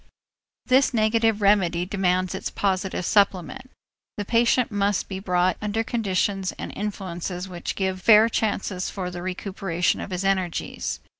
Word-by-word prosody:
This 260 Hz, 0 st, +3 dB
negative 220 Hz, -1 st, +2 dB
remedy 180 Hz, -4 st, +3 dB
demands 185 Hz, -1 st, 0 dB
its 190 Hz, -, -4 dB
positive 190 Hz, -2 st, -1 dB
supplement. 205 Hz, +6 st, +1 dB, 0.5 s
The 205 Hz, -, -3 dB
patient 235 Hz, +2 st, +2 dB
must 205 Hz, -1 st, 0 dB
be 190 Hz, -1 st, -5 dB
brought 180 Hz, -2 st, +1 dB
under 210 Hz, +1 st, -1 dB
conditions 195 Hz, -4 st, -1 dB
and -, -, -7 dB
influences 185 Hz, -3 st, -4 dB
which 175 Hz, -2 st, -5 dB
give 190 Hz, -1 st, -2 dB
fair 220 Hz, +1 st, +7 dB
chances 200 Hz, -4 st, -1 dB
for 185 Hz, -2 st, -5 dB
the 175 Hz, 0 st, -6 dB
recuperation 185 Hz, -1 st, -2 dB
of -, -, -6 dB
his 185 Hz, +1 st, -3 dB
energies. 190 Hz, -3 st, -1 dB
195 Hz, 140 wpm, -24 LUFS, 185-210 Hz, 0.5 s, fair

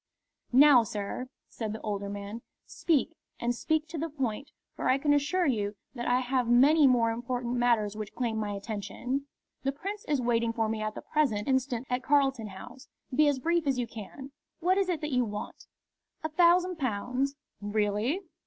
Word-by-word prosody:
"Now, 270 Hz, 0 st, +8 dB
sir," 210 Hz, +3 st, -4 dB, 0.2 s
said 220 Hz, -2 st, -5 dB
the 220 Hz, -, -7 dB
older 200 Hz, -2 st, -3 dB
man, 205 Hz, +3 st, -6 dB, 0.2 s
"speak, 325 Hz, -1 st, 0 dB, 0.3 s
and 240 Hz, 0 st, 0 dB
speak 315 Hz, +5 st, 0 dB
to 325 Hz, -1 st, -5 dB
the 325 Hz, +2 st, -2 dB
point, 275 Hz, -2 st, -3 dB, 0.3 s
for -, -, -1 dB
I 260 Hz, -, +4 dB
can 290 Hz, +1 st, +2 dB
assure 295 Hz, +6 st, +2 dB
you 210 Hz, -7 st, 0 dB, 0.2 s
that 240 Hz, -2 st, -4 dB
I 250 Hz, +1 st, +3 dB
have 255 Hz, -1 st, 0 dB
many 280 Hz, +5 st, +6 dB
more 235 Hz, -3 st, +3 dB
important 245 Hz, +1 st, -3 dB
matters 230 Hz, -4 st, +2 dB
which 215 Hz, -1 st, -6 dB
claim 235 Hz, -3 st, -1 dB
my 210 Hz, -1 st, -2 dB
attention. 220 Hz, +7 st, -4 dB, 0.3 s
The 270 Hz, -, 0 dB
Prince 400 Hz, +9 st, -6 dB
is 290 Hz, -2 st, +1 dB
waiting 235 Hz, -1 st, +1 dB
for 225 Hz, -1 st, 0 dB
me 215 Hz, 0 st, -2 dB
at 215 Hz, 0 st, -3 dB
the -, -, -7 dB
present 250 Hz, -10 st, 0 dB
instant 260 Hz, -2 st, 0 dB
at 250 Hz, 0 st, -1 dB
Carlton 270 Hz, -5 st, +2 dB
House. 240 Hz, +6 st, -11 dB, 0.3 s
Be 300 Hz, +3 st, +4 dB
as 285 Hz, -2 st, +2 dB
brief 335 Hz, +3 st, 0 dB
as 270 Hz, -2 st, +2 dB
you 245 Hz, -, 0 dB
can. 235 Hz, +5 st, -9 dB, 0.3 s
What 365 Hz, +3 st, +2 dB
is 385 Hz, -2 st, +1 dB
it 335 Hz, -4 st, -1 dB
that 300 Hz, -2 st, -3 dB
you 250 Hz, 0 st, +3 dB
want?" 210 Hz, -2 st, -6 dB, 0.6 s
"A 315 Hz, -, -1 dB
thousand 355 Hz, +2 st, +4 dB
pounds." 255 Hz, +3 st, -1 dB, 0.3 s
"Really! 210 Hz, -, 0 dB
250 Hz, 185 wpm, -29 LUFS, 220-290 Hz, 0.6 s, Now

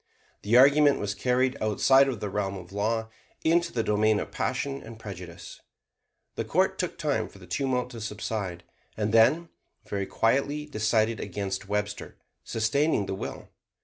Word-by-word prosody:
The 110 Hz, +4 st, +3 dB
argument 140 Hz, +2 st, +6 dB
was 100 Hz, 0 st, -2 dB
carried 125 Hz, +5 st, +1 dB
outside 135 Hz, +6 st, +4 dB
of 120 Hz, -6 st, -3 dB
the 105 Hz, -, -2 dB
realm 100 Hz, -1 st, -2 dB
of 90 Hz, -1 st, -11 dB
law 110 Hz, +2 st, -1 dB, 0.3 s
into 170 Hz, +2 st, +2 dB
the 115 Hz, -, -1 dB
domain 105 Hz, 0 st, +2 dB
of -, -, -5 dB
passion 135 Hz, +1 st, -2 dB
and 115 Hz, 0 st, -10 dB
prejudice. 90 Hz, -6 st, -9 dB, 0.7 s
The -, -, -3 dB
court -, -, +1 dB
took -, -, -2 dB
time -, -, -1 dB
for -, -, -16 dB
the -, -, -13 dB
tumult 130 Hz, -3 st, -1 dB
to 115 Hz, -2 st, -8 dB
subside, 105 Hz, -4 st, -4 dB, 0.3 s
and 105 Hz, 0 st, -1 dB
then 155 Hz, +10 st, +4 dB, 0.4 s
very 100 Hz, -1 st, -2 dB
quietly 140 Hz, +6 st, +1 dB
decided 110 Hz, -3 st, +1 dB
against 100 Hz, -1 st, -4 dB
Webster, 105 Hz, 0 st, -3 dB, 0.3 s
sustaining 115 Hz, +2 st, +1 dB
the 95 Hz, -, -3 dB
will. 95 Hz, -, -6 dB
110 Hz, 155 wpm, -27 LUFS, 105-130 Hz, 0.7 s, argument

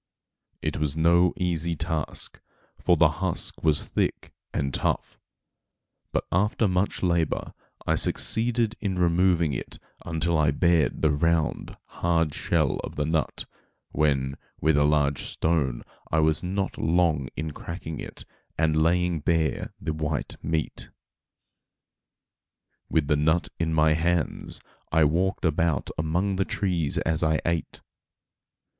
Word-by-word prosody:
It -, -, -1 dB
was 75 Hz, 0 st, -1 dB
no 85 Hz, +2 st, +4 dB
easy 85 Hz, -2 st, -1 dB
task, 80 Hz, -1 st, -3 dB, 0.4 s
for 90 Hz, -2 st, +3 dB
the 80 Hz, -, +6 dB
husk 95 Hz, -3 st, 0 dB
was 75 Hz, -3 st, +3 dB
thick -, -, -2 dB, 0.2 s
and 70 Hz, -1 st, -2 dB
tough; -, -, -2 dB, 0.9 s
but -, -, 0 dB
after 105 Hz, +4 st, +2 dB
much 90 Hz, +2 st, 0 dB
labor 85 Hz, -3 st, 0 dB, 0.3 s
I -, -, +2 dB
succeeded 115 Hz, -1 st, +1 dB
in 100 Hz, -3 st, -2 dB
removing 85 Hz, -2 st, +2 dB
it -, -, -5 dB, 0.3 s
until 80 Hz, -1 st, 0 dB
I 75 Hz, -1 st, +4 dB
bared 85 Hz, +2 st, +2 dB
the 80 Hz, -, +4 dB
round, 80 Hz, +1 st, 0 dB
hard 85 Hz, -3 st, 0 dB
shell 80 Hz, -3 st, +1 dB
of -, -, -7 dB
the 75 Hz, -, -1 dB
nut, 80 Hz, -2 st, -1 dB, 0.5 s
when, 70 Hz, -3 st, +1 dB, 0.2 s
with 80 Hz, 0 st, +3 dB
a 75 Hz, 0 st, +4 dB
large 75 Hz, -2 st, +2 dB
stone 75 Hz, -7 st, 0 dB, 0.3 s
I 80 Hz, -, +2 dB
was 80 Hz, -1 st, +3 dB
not 95 Hz, +2 st, -2 dB
long 80 Hz, -5 st, +2 dB
in 80 Hz, 0 st, -3 dB
cracking 80 Hz, 0 st, -7 dB
it, -, -, -8 dB, 0.3 s
and 80 Hz, -1 st, +2 dB
laying 85 Hz, +1 st, +2 dB
bare 80 Hz, +1 st, 0 dB
the 80 Hz, -, -3 dB
white 75 Hz, -1 st, -3 dB
meat. 80 Hz, -1 st, -2 dB, 2.0 s
With 80 Hz, -2 st, +2 dB
the 75 Hz, -, +3 dB
nut 80 Hz, +3 st, +2 dB
in 80 Hz, -1 st, 0 dB
my 80 Hz, 0 st, +4 dB
hands 85 Hz, 0 st, -1 dB, 0.3 s
I 80 Hz, 0 st, +4 dB
walked 90 Hz, +6 st, +1 dB
about 80 Hz, -2 st, +1 dB
among 90 Hz, +5 st, 0 dB
the 95 Hz, -, +2 dB
trees 85 Hz, -8 st, -1 dB
as 80 Hz, -1 st, +1 dB
I 80 Hz, -2 st, +2 dB
ate. 85 Hz, -1 st, -2 dB
80 Hz, 135 wpm, -26 LUFS, 75-85 Hz, 2.0 s, the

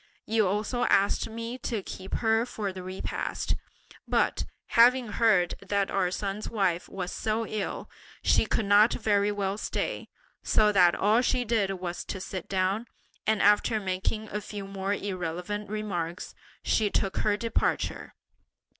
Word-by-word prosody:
You 220 Hz, -2 st, +2 dB
also 215 Hz, +5 st, 0 dB
asked 200 Hz, +3 st, +2 dB
me 230 Hz, +3 st, -5 dB
to 225 Hz, -5 st, -3 dB
keep 190 Hz, +1 st, -6 dB
her 225 Hz, 0 st, +2 dB
for 210 Hz, -5 st, -4 dB
the 185 Hz, -, -7 dB
repast, 185 Hz, +1 st, -3 dB, 0.5 s
but, -, -, +1 dB, 0.2 s
having 245 Hz, 0 st, +5 dB
heard 210 Hz, -6 st, +3 dB
that 200 Hz, -1 st, 0 dB
our 190 Hz, -2 st, +1 dB
son's 200 Hz, +2 st, -3 dB
wife 185 Hz, -5 st, 0 dB
was 185 Hz, -2 st, -4 dB
so 220 Hz, +1 st, -1 dB
ill 215 Hz, -2 st, -4 dB, 0.4 s
she -, -, +3 dB
could 220 Hz, -, 0 dB
not 205 Hz, +3 st, +6 dB
very 205 Hz, -2 st, +2 dB
well 200 Hz, 0 st, -2 dB
stay, -, -, -3 dB, 0.3 s
so 210 Hz, -1 st, +3 dB
that 180 Hz, -4 st, +5 dB
all 215 Hz, +4 st, +3 dB
she 250 Hz, 0 st, +1 dB
did 215 Hz, -4 st, +1 dB
was 180 Hz, -1 st, -4 dB
to 190 Hz, -, -5 dB
sit 185 Hz, -1 st, -6 dB
down, 195 Hz, +4 st, 0 dB, 0.4 s
and 220 Hz, -1 st, +2 dB
after 210 Hz, +2 st, +4 dB
making 195 Hz, +3 st, -2 dB
a 210 Hz, -, -3 dB
few 205 Hz, -1 st, -7 dB
more 195 Hz, +1 st, -2 dB
irrelevant 190 Hz, +2 st, -4 dB
remarks, 185 Hz, -5 st, -4 dB, 0.3 s
she 215 Hz, -2 st, +2 dB
took 195 Hz, -1 st, -1 dB
her 205 Hz, -1 st, +2 dB
departure. 230 Hz, +1 st, -1 dB
205 Hz, 150 wpm, -28 LUFS, 190-220 Hz, 0.5 s, not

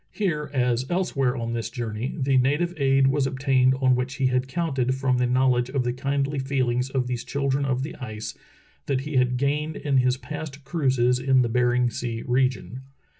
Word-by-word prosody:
Here, 160 Hz, -8 st, -2 dB
as 125 Hz, -1 st, 0 dB
elsewhere 140 Hz, -8 st, 0 dB
on 115 Hz, 0 st, -3 dB
this 115 Hz, -1 st, -3 dB
jour 115 Hz, -2 st, -4 dB
ney, 115 Hz, +5 st, -4 dB
the 135 Hz, 0 st, +1 dB
native 145 Hz, +7 st, +2 dB
aid 135 Hz, -1 st, +3 dB
was 135 Hz, 0 st, +2 dB
obtained 130 Hz, -1 st, +2 dB
on 130 Hz, -1 st, +3 dB
which 125 Hz, +2 st, -1 dB
he 135 Hz, -, 0 dB
had 130 Hz, 0 st, +1 dB
counted 135 Hz, -5 st, -1 dB
from 130 Hz, -2 st, +1 dB
the 125 Hz, -, +2 dB
knowledge 125 Hz, -1 st, +2 dB
of 135 Hz, -1 st, 0 dB
the 120 Hz, 0 st, -1 dB
kindly 140 Hz, +2 st, -1 dB
feelings 130 Hz, -2 st, 0 dB
of 135 Hz, -2 st, -1 dB
these 125 Hz, -1 st, -3 dB
children 140 Hz, 0 st, -1 dB
of 130 Hz, -1 st, 0 dB
the 160 Hz, +4 st, -6 dB
ice 110 Hz, -5 st, -6 dB, 0.5 s
that 135 Hz, -2 st, 0 dB
he 150 Hz, 0 st, -3 dB
had 125 Hz, 0 st, +2 dB
gained 150 Hz, +4 st, -1 dB
in 140 Hz, -2 st, 0 dB
his 125 Hz, 0 st, +2 dB
past 145 Hz, 0 st, -7 dB
cruises 130 Hz, -4 st, +1 dB
in 130 Hz, 0 st, +3 dB
the 120 Hz, -, -1 dB
Bering 125 Hz, 0 st, +2 dB
Sea 115 Hz, 0 st, -4 dB
region. 130 Hz, 0 st, 0 dB
130 Hz, 195 wpm, -25 LUFS, 125-140 Hz, 0.5 s, aid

